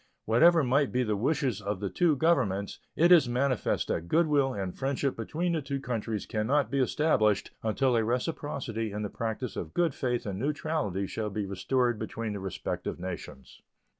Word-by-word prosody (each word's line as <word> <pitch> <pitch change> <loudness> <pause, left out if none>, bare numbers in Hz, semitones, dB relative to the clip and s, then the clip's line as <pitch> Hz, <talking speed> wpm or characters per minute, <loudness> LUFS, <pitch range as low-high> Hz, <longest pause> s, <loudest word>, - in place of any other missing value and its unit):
Whatever 160 +9 +5
might 140 +2 +2
be 125 0 +1
the 110 -3 0
wishes 130 -1 0
of 100 -1 -3
the 100 - -2
two 170 -4 +3
Governments, 100 - +1 0.2
it 170 +2 +4
is 155 -8 +7
manifest 130 0 0
that 85 +1 -2
good 165 - +3
will 140 -3 +2
and 95 -6 -4
friendship 135 0 -1
between 165 +10 -2
the 165 -2 0
two 140 0 -3
countries 115 -5 -3
can 110 0 -2
not 145 +2 +2
be 140 - +1
established 130 -6 +2
until 125 +3 +1
a 115 - +3
reciprocity 120 -3 -2
in 105 +1 -4
the 105 - -3
practice 115 +2 -3
of 80 - -6
good 170 -4 +2
faith 125 -2 -2
and 100 -2 -4
neutrality 140 - -1
shall 105 +2 -3
be 105 0 -3
restored 120 +5 0
between 110 0 -4
the 100 - -4
respective 95 -2 -4
nations. 85 -7 -8
120 Hz, 185 wpm, -29 LUFS, 105-140 Hz, 0.2 s, is